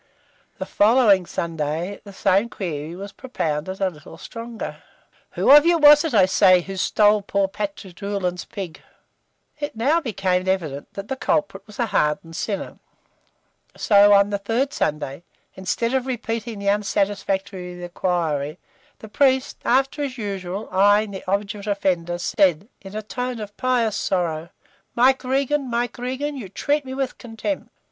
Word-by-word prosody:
The - - -4
following 210 -4 +4
Sunday 165 +3 -3
the 200 - -11
same 195 +3 +2
query 165 -6 -5
was 200 +2 -8
propounded 185 - -3
a 190 -2 +1
little 155 0 -13
stronger 230 +3 -7 0.6
"Who - - +3
of 295 +1 +10
you 340 +1 +4
was 295 -1 +8
it, 320 -7 -1
I 195 -3 +7
say, 185 -1 +5
who 195 +2 -7
stole 210 +2 +3
poor 200 0 0
Pat 200 +1 -4
Doolan's 185 -1 -4
pig?" 185 -5 -7 0.8
It 290 -4 -4
now 285 +9 +2
became 190 - -1
evident 155 -7 -2
that 200 0 -7
the 265 - -2
culprit 265 -8 -1
was 210 - -13
a 240 - +1
hardened 165 -4 0
sinner; 200 +3 -4 1.0
so 205 -1 +5
on 200 0 +5
the 200 - -1
third 230 +7 -1
Sunday, 150 -1 -2 0.3
instead 230 +6 -2
of 265 -1 0
repeating 230 -2 -3
the 200 0 -5
unsatisfactory 195 -3 -2
inquiry, 165 -4 -1 0.4
the 220 - -11
priest, 265 +4 +1
after, 270 +4 +1
as 275 -2 -3
usual, 195 -2 -4
eyeing 205 +2 +4
the 190 - -7
obdurate 200 +2 -2
offender, 180 -4 0
said, 190 -1 +1
in 195 +1 -10
a 215 - -4
tone 250 +2 -4
of 210 -1 -8
pious 240 -4 +1
sorrow, 170 -3 -1 0.5
"Mike 260 +2 +4
Regan, 270 +1 0
Mike 240 0 -2
Regan, 260 +4 -3
you 230 -8 -7
treat 290 +8 -1
me 260 0 -6
with 270 -2 -3
contempt!" 240 +6 -4
205 Hz, 155 wpm, -22 LUFS, 185-245 Hz, 1.0 s, of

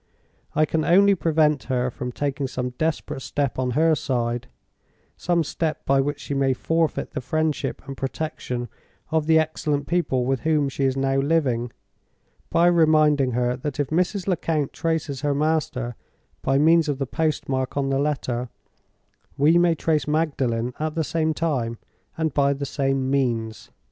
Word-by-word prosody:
I 155 +1 +4
can 160 0 -1
only 200 +4 +5
prevent 155 -5 +2
her 125 -1 0
from 125 +1 -5
taking 140 +1 -2
some 125 -1 -3
desperate 155 0 -2
step 140 -1 -2
on 125 -1 0
her 160 0 +4
side—some 130 +5 -3
step 155 +1 -3
by 135 0 +3
which 145 +2 -2
she - - -4
may 135 -1 +2
forfeit 165 +5 -1
the - - -4
friendship 155 +4 -1
and 135 - -6
protection 135 -3 -4 0.4
of 160 -1 +1
the 160 0 +5
excellent 150 -2 0
people 140 -7 0
with 135 0 0
whom 150 -2 +1
she 135 +1 -1
is 135 0 +1
now 135 0 +1
living—by 140 +3 -2
reminding 155 -6 +4
her 125 +1 +1
that 145 +2 -5
if 145 0 -1
Mrs. 180 +3 0
Lecount 160 -5 0
traces 160 -5 -2
her 145 -1 0
master 145 -5 -1 0.5
by 135 - +1
means 160 +2 +4
of 145 - -1
the 135 - -1
postmark 135 -3 -1
on 135 -1 0
the 135 - +1
letter, 130 -4 -1 0.9
we 155 +5 +5
may 175 -1 +3
trace 155 -3 0
Magdalen 130 -6 0
at 155 0 -2
the 165 - +1
same 160 +1 0
time, 130 -9 -1 0.4
and 160 -3 -1
by 140 -1 +3
the 140 0 -4
same 135 -1 -1
means. 115 -5 -1
145 Hz, 160 wpm, -24 LUFS, 130-160 Hz, 0.9 s, only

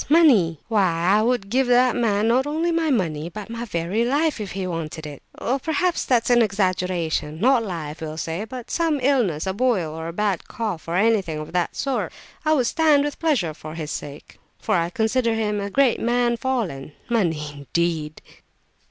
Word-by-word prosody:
Money! 250 - +5
Why 190 -3 +2
I - - +3
would 235 -3 0
give 260 +1 +2
that 245 0 +4
man 220 -3 +1
not 260 +4 +2
only 320 +3 0
my 330 -1 +1
money, 170 - 0
but 210 +5 -8
my 230 +1 -4
very 185 +2 -1
life, 285 +1 +1
if 200 - -5
he 190 0 -3
wanted 165 -2 -5
it. 145 -2 -8 0.2
Well, 265 +3 0
perhaps 325 +5 0
that's 245 -1 +2
exaggeration; 185 -8 +1
not 245 +2 +4
life, 165 -7 -5
we'll 155 -1 -5
say, 165 +6 -3
but 245 +1 -8
some 325 -4 +1
illness, 245 - +1
a 190 - -1
boil 200 -8 0
or 160 0 -5
a 165 - -5
bad 200 -2 -1
cough, 210 -9 -4
or 170 - -2
anything 195 -5 +2
of 155 +2 -7
that 175 -1 0
sort, 275 -2 -2 0.3
I 310 - +3
would 260 -5 +2
stand 300 +1 +3
with 290 -1 -4
pleasure, 255 - +1
for 155 +1 -9
his 155 -2 -5
sake; 145 0 -8 0.2
for 215 - -2
I 170 -1 +1
consider 225 +4 +1
him 210 -2 -1
a 200 - -3
great 270 +2 +3
man 240 0 +1
fallen—money, 170 - -2
indeed!" 155 +2 -2
210 Hz, 185 wpm, -23 LUFS, 165-250 Hz, 0.3 s, Money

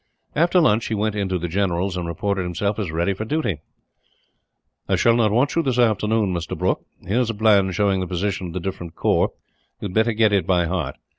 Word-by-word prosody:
After 170 +4 +3
lunch 115 -9 +3
he 110 - -1
went 105 +1 0
into 95 -3 -1
the 85 0 -3
general's, 90 +1 -1
and 90 -2 -3
reported 95 +3 -2
himself 100 +4 -2
as 100 -5 -2
ready 85 +4 0
for 95 - -5
duty. 110 - -1 1.3
"I - - +3
shall 115 -1 +3
not 115 -3 +3
want 125 +6 +2
you 165 - +3
this 130 -6 -1
afternoon, 110 -3 +2
Mr. 85 -2 -4
Brooke. - - 0 0.2
Here 105 +6 +1
is 125 -2 +1
a 115 - -2
plan 100 -3 +3
showing 100 +1 +1
the 95 - -2
position 95 +1 -2
of 85 - -8
the 90 - -2
different 90 -2 -6
corps. - - +2 0.5
You 100 - -4
had - - -10
better 110 +2 +2
get 110 -1 +3
it 100 - +1
by 90 -2 +3
heart. 85 -6 -2
100 Hz, 220 wpm, -22 LUFS, 90-110 Hz, 1.3 s, After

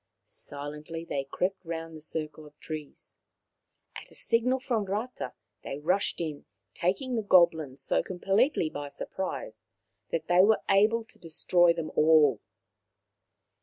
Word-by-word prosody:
Silently 150 +3 -7
they 140 -4 -3
crept 185 +4 -2
round 165 -1 -5
the 155 - -10
circle 155 0 -3
of 150 0 -20
trees. 155 -2 -7 0.8
At - - -9
a - - -16
signal 250 +3 +1
from 235 -5 -1
Rata 215 +6 -4 0.3
they 135 - -5
rushed 180 +7 0
in, 155 -4 -4 0.3
taking 195 +9 -1
the 225 - +1
goblins 160 -9 +3
so - - +2
completely 195 - +1
by 145 -2 -6
surprise 190 - -5 0.4
that 160 -1 -2
they 175 +1 +6
were 215 +2 +3
able 215 +4 +4
to 225 - -19
destroy 175 +1 +3
them 160 -2 -5
all. 150 -6 +5
170 Hz, 135 wpm, -29 LUFS, 155-200 Hz, 0.8 s, they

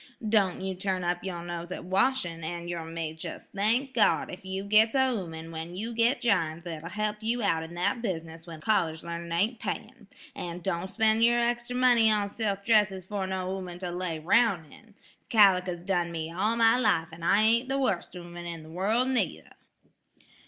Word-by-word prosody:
Don' 200 -4 +2
you 190 0 -2
turn 185 0 -2
up 175 0 -1
yer 175 -3 -5
nose 175 0 -6
at - - -6
washin', 185 -3 0
an' 170 +1 -5
yer 170 -1 -4
may 165 -1 -4
jes' 160 - -8
thank 230 +7 +1
God 225 -5 +2
ef 180 - -9
you 190 +1 -4
gits 215 +4 +4
a 265 -1 +3
'ooman 165 -7 -5
when 165 +2 -6
you 225 +5 -4
git 235 +4 +2
jined 170 -8 +1
that'll 165 -2 -6
help 210 +2 -2
you 230 +1 -1
out 165 -5 +2
in 160 +1 -8
that 180 +7 0
business 165 -6 -5
when 160 -2 -9
college 165 -5 +1
learnin' 170 0 -6
ain't 210 +8 0
payin'. - - -6 0.3
An' 175 0 -5
don' 180 0 -2
spend 220 +1 +3
yer 240 +1 +5
extra 240 +1 -1
money 245 -3 +5
on 205 -2 +1
silk 200 -3 -2
dresses 210 -5 +3
fer 195 -1 -3
no 185 -1 -3
'ooman 180 -2 -6
to 180 -1 -4
lay 175 -2 -3
roun' 180 +1 +2
in. 215 -2 -18 0.3
Caliker's 185 -5 +4
done 175 -3 0
me 160 -1 -4
all 215 +5 +1
my 230 +1 +4
life 165 -9 +2
an' 165 +1 -11
I 195 +5 +4
ain't 235 +4 +3
the 270 - 0
worst 205 -10 -1
'ooman 175 0 -8
in 165 -2 -6
the 155 - -13
wurl' 210 +8 +1
neither." 260 -1 -1
190 Hz, 195 wpm, -28 LUFS, 170-220 Hz, 0.3 s, yer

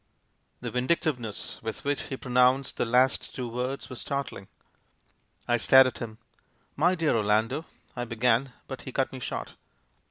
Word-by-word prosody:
The - - -4
vindictiveness 125 - -1
with 110 0 -5
which 145 0 0
he 135 - -3
pronounced 125 +1 +2
the - - +1
last 125 +3 +2
two 125 -2 -3
words 125 +3 -3
was 130 - -7
startling. 140 -9 -4 1.0
I 120 - +3
stared 130 +3 +7
at 130 - -2
him. 110 -2 -6 0.6
"My 175 +5 +3
dear 165 -6 +2
Orlando 110 +8 +1 0.2
" - - -35
I 120 -1 -3
began, 120 +2 +2 0.2
but 130 - -6
he 130 - -7
cut 135 +1 0
me 130 - -6
short. - - -5
125 Hz, 160 wpm, -28 LUFS, 115-135 Hz, 1.0 s, stared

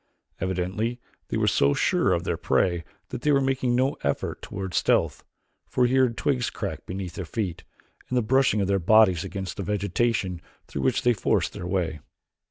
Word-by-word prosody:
Evidently 95 +6 -2 0.3
they - - -2
were - - +1
so 70 +1 +3
sure - - +2
of - - +1
their - - -1
prey 85 -2 +1 0.3
that - - -5
they 150 - +2
were 140 - +5
making 130 -2 +1
no 130 +3 +2
effort 70 - -2
toward 95 -2 -6
stealth, - - +1 0.4
for 125 - +2
he 120 - +1
heard 130 -3 +3
twigs 125 -4 0
crack - - -5
beneath 90 -2 -5
their 95 - -5
feet, 90 -1 -4 0.5
and 125 - 0
the 120 - +2
brushing 125 -3 +3
of 95 - 0
their 100 0 +2
bodies 95 -2 +5
against 95 -2 -5
the - - -3
vegetation 100 -1 0 0.2
through 70 - -5
which 65 - +1
they 120 - +4
forced 105 - 0
their 85 - -6
way. 90 -4 -1
100 Hz, 185 wpm, -26 LUFS, 90-120 Hz, 0.5 s, were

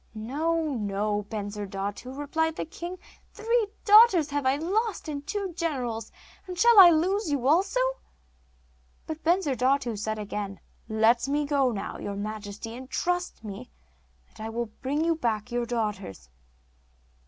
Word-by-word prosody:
'No, 305 +7 -1
no, 205 0 -1
Bensurdatu,' 205 +3 -5
replied 320 +2 -1
the - - -3
king. 345 +3 -7 0.4
'Three 455 0 +1 0.2
daughters 410 -8 +7
have 285 -2 0
I 265 - +4
lost, 390 +6 -1
and 290 -1 -5
two 400 -1 -3
generals, 250 -10 -3 0.4
and 365 -1 -6
shall 465 +2 +7
I 365 -2 +11
lose 360 +4 +1
you 265 -3 0
also?' - - +2 1.1
But 315 0 -6
Bensurdatu 275 - +1
said 215 +1 -3
again: 205 -2 -5 0.3
'Let 220 +3 +3
me 290 +1 0
now 280 -3 +2 0.3
go, - - -13
your 200 - -4
majesty; 215 +3 -6
trust 355 -2 -2
me, 215 +4 -8 0.6
and 215 - -10
I 220 - -4
will 230 -1 -3
bring 290 +4 0
you 335 - +3
back 235 -6 -2
your 240 0 -1
daughters. 205 - -3
275 Hz, 140 wpm, -27 LUFS, 215-335 Hz, 1.1 s, I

